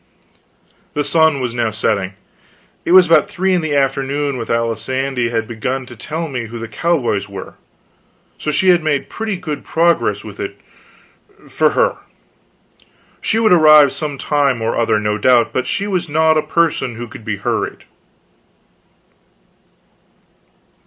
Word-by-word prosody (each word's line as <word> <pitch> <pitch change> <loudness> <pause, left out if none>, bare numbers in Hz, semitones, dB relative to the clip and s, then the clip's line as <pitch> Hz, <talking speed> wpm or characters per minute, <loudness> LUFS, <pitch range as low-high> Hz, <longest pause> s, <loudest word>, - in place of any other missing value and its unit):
The 145 - 0
sun 160 -2 +3
was 125 -2 -3
now 120 -2 0
setting. 105 -3 -1 0.7
It - - 0
was 185 0 +8
about 170 +4 +3
three 190 -1 0
in 180 - +2
the 155 -2 -2
afternoon 140 +1 0
when 115 -2 -5
Alisande 115 +2 -1
had 115 -2 -2
begun 125 +4 -3
to 120 - -12
tell 160 +8 -4
me 125 -5 -5
who 115 +2 -8
the 115 0 -6
cowboys 115 -5 -1
were; 95 -1 -8 0.9
so - - -3
she 185 +5 +2
had 175 -1 +5
made 145 -3 -1
pretty 220 -3 -3
good 155 -5 -5
progress 170 +1 +1
with - - -11
it - - -6 0.9
for - - +2
her. - - +2 1.2
She - - 0
would 220 -4 +4
arrive 155 -4 +7
some 150 -3 -4
time 140 -3 +1
or 115 0 -1
other, 115 -2 +1
no 105 0 -1
doubt, 120 +1 +3
but 130 0 -1
she 200 - -1
was 180 -4 -2
not 160 +1 +3
a 155 - +3
person 155 -6 0
who 120 +1 -7
could 110 - -12
be 105 -1 -3
hurried. - - -3
140 Hz, 150 wpm, -17 LUFS, 115-160 Hz, 1.2 s, was